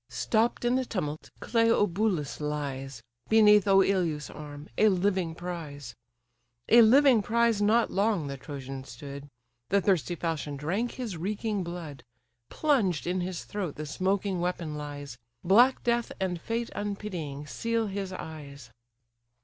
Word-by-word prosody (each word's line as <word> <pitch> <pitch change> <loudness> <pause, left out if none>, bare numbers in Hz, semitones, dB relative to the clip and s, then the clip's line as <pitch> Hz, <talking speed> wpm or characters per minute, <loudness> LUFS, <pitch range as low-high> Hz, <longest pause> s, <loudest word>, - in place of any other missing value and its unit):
Stopp'd 220 - 0
in 245 +1 +3
the 260 - 0
tumult 155 -10 -4
Cleobulus 210 - +1
lies, 135 -5 -4 0.3
Beneath 210 -2 +6
Oïleus' 190 -6 +2
arm, 145 0 -9
a 215 - +5
living 185 -3 0
prize; 155 -8 -7 0.8
A 235 - +8
living 255 +1 +6
prize 230 0 +2
not 225 +3 +3
long 200 -5 +1
the 140 -1 -4
Trojan 135 -1 -7
stood; 140 0 -9 0.4
The 200 - +4
thirsty 185 -3 +1
falchion 155 -4 -3
drank 190 - -2
his 230 -9 -5
reeking 205 +3 -2
blood: 165 -7 -7 0.5
Plunged 230 - +1
in 180 +1 -1
his 180 -1 -4
throat 190 -8 -4
the 155 - -5
smoking 190 +4 -1
weapon 175 -3 -2
lies; 145 -4 -7 0.2
Black 240 +8 +5
death, 235 -1 0
and 180 -3 -2
fate 230 +1 -3
unpitying, 185 -8 -4
seal 230 +8 -1
his 195 -2 -4
eyes. 140 -8 -9
180 Hz, 135 wpm, -28 LUFS, 150-210 Hz, 0.8 s, A